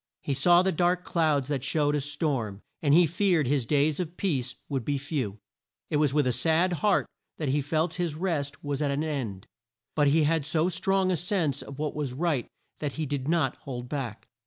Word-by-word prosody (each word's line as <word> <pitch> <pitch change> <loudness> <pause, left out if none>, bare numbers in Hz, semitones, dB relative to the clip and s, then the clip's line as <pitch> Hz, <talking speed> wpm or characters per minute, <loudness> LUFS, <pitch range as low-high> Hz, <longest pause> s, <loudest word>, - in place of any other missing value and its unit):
He 140 - -1
saw 175 +6 +5
the 190 - +2
dark 180 +2 +1
clouds 155 -7 +1
that 140 -3 -1
showed 145 +1 +1
a 150 - +1
storm, 135 - -2 0.2
and 145 - +2
he 175 +1 +7
feared 175 -2 +2
his 130 -2 0
days 145 0 +2
of 175 -1 -4
peace 135 -10 -1
would 135 -4 -2
be 145 +4 0
few. 135 -7 -3 0.5
It 150 - +2
was 150 -2 +3
with 145 0 +2
a 125 - +2
sad 160 +8 +2
heart 200 +3 +2 0.3
that 150 -4 -2
he 145 +2 +2
felt 160 +4 0
his 165 -4 -1
rest 150 -5 -2
was 145 0 -2
at 145 - +1
an 140 +2 0
end, 125 -11 -3 0.5
but 145 -1 +3
he 155 +3 +4
had 160 0 +2
so 155 +4 +1
strong 190 +1 +1
a - - +2
sense 170 - 0
of 140 - -9
what 150 0 -2
was 145 -4 -3
right 150 -3 0 0.3
that 145 -3 -3
he 160 - -2
did 140 -1 -3
not 160 -5 +1
hold 125 -2 -6
back. 130 -7 -4
150 Hz, 210 wpm, -28 LUFS, 140-165 Hz, 0.5 s, he